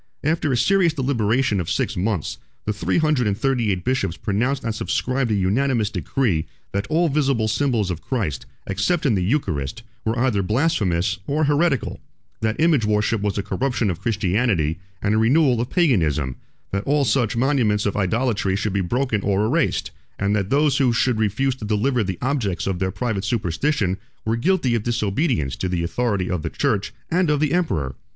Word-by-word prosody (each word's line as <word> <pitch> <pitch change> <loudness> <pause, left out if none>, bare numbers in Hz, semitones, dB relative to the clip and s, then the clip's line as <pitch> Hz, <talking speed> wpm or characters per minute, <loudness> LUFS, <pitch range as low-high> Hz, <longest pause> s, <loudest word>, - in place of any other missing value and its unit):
After 155 -1 +1
a 125 - +1
serious 175 +5 +3
deliberation 120 -5 +1
of 85 - -3
six - - -1
months, 95 -3 -2 0.3
the 105 - 0
three 105 - -1
hundred 150 -7 +2
and 100 -1 0
thirty 120 -3 +1
eight 90 -2 -2
bishops 100 -9 -1
pronounced 125 +7 -1
and 115 - -1
subscribed 125 +6 -1
a 110 - +2
unanimous 110 +3 +1
decree, 105 - 0 0.2
that 100 0 -2
all 170 +2 +2
visible 135 -6 +1
symbols 110 -4 +1
of 85 - -5
Christ, 105 - -3 0.2
except 110 - 0
in 130 - +3
the 95 - +1
Eucharist, 90 - -1 0.2
were 110 +2 -1
either 120 -5 +2
blasphemous 100 - +1
or 150 +2 +1
heretical; 145 - +1 0.4
that 110 0 -1
image 155 -6 +3
worship 105 +1 +1
was 105 -1 -1
a 100 - -1
corruption 125 -5 0
of 85 - -7
Christianity 100 -6 0 0.2
and 105 - +2
a - - +2
renewal 125 +1 +3
of 120 - -3
Paganism; 80 - +1 0.4
that 100 +1 -1
all 145 0 +2
such 115 -2 +1
monuments 120 -6 +2
of 100 - 0
idolatry 105 -1 0
should 105 0 -1
be 100 - +1
broken 120 +3 0
or 100 +1 +1
erased; 155 +9 0 0.3
and 100 +1 +1
that 100 -2 -1
those 145 0 +3
who 130 -3 +3
should 120 -1 +1
refuse 110 +6 +1
to 115 - -10
deliver 110 +4 +1
the 95 -3 -3
objects 125 -9 -1
of 95 -2 -2
their 95 0 0
private 105 -1 -2
superstition, 100 - 0 0.3
were 110 +1 +1
guilty 145 -1 +1
of 115 - +1
disobedience 110 - 0
to 95 - -3
the 90 -2 -1
authority 100 0 -1
of 90 -3 -2
the - - -3
church - - -1 0.2
and 180 -1 +2
of 150 -1 +2
the 150 0 +1
emperor. 80 - 0
110 Hz, 185 wpm, -22 LUFS, 100-135 Hz, 0.4 s, serious